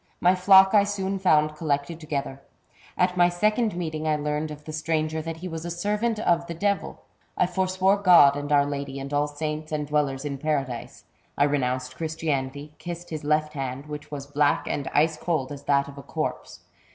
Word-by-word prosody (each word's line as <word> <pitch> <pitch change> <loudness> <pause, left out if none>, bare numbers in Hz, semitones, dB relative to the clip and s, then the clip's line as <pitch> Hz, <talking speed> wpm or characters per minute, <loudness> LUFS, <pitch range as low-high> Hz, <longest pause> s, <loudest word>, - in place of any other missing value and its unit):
My 180 +1 +4
flock 190 +1 +6
I 205 -1 +6
soon 195 -1 -2
found 155 -4 +3
collected 150 +1 -2
together. 140 -4 -4 0.6
At 180 0 +2
my 175 0 +5
second 215 +4 +1
meeting 155 -3 -3
I 155 - +2
learned 150 +1 -2
of 150 0 -10
the 155 - -7
stranger 155 0 -1
that 165 0 -5
he 180 +3 -6
was 165 -2 -6
a 175 - -4
servant 210 +6 -1
of 170 -5 +1
the 170 - -5
devil. 200 +3 -2 0.3
I - - +4
forswore 185 +2 +1
God 175 -8 +7
and 145 0 -4
our 145 -1 +5
Lady 140 -1 -4
and 140 +1 -6
all 145 +1 +2
saints 150 +1 -5
and 150 -1 -1
dwellers 145 -2 -1
in 140 -2 -4
Paradise. 140 -5 -3 0.3
I 140 - +4
renounced 130 -3 -1
Christianity, 150 -2 -3
kissed 175 0 -7
his 155 -1 -5
left 150 +1 +1
hand, 135 -1 -4
which 150 -1 -8
was 140 -2 -6
black 145 0 +1
and 140 - -2
ice 155 +1 +2
cold 155 -6 -2
as 140 -1 -8
that 140 -1 +2
of 140 0 -10
a - - -7
corpse. - - -5
155 Hz, 195 wpm, -25 LUFS, 145-175 Hz, 0.6 s, God